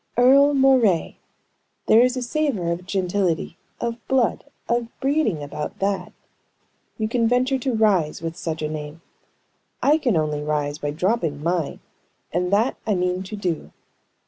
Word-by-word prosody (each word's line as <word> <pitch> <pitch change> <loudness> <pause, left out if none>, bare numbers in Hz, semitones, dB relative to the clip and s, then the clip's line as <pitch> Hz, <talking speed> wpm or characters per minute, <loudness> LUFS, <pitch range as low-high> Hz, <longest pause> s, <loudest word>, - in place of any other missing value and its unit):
Earle 275 +4 +6
Moray. 255 -10 +3 0.7
There 225 - +6
is 250 +1 +2
a 255 - -2
savor 240 - -1
of 175 +2 -5
gentility, 185 -3 -1 0.2
of 235 -1 -2
blood, 260 -1 +1 0.2
of 235 0 0
breeding, 270 - 0
about 145 +1 -5
that. 195 0 -1 0.9
You 220 - -1
can 230 0 +1
venture 255 +3 +2
to 255 -1 -1
rise 195 -8 +2
with 165 0 -5
such 160 -2 -4
a - - 0
name. 150 +1 -7 0.8
I 300 +3 +4
can 245 - +1
only 150 -1 -1
rise 150 0 -2
by 145 - -2
dropping 165 -2 -1
mine, 170 -3 -1 0.5
and 180 +2 0
that 220 +6 +2
I 210 - +2
mean 180 0 0
to 190 +3 -7
do." 180 -6 -3
195 Hz, 150 wpm, -23 LUFS, 165-245 Hz, 0.9 s, Earle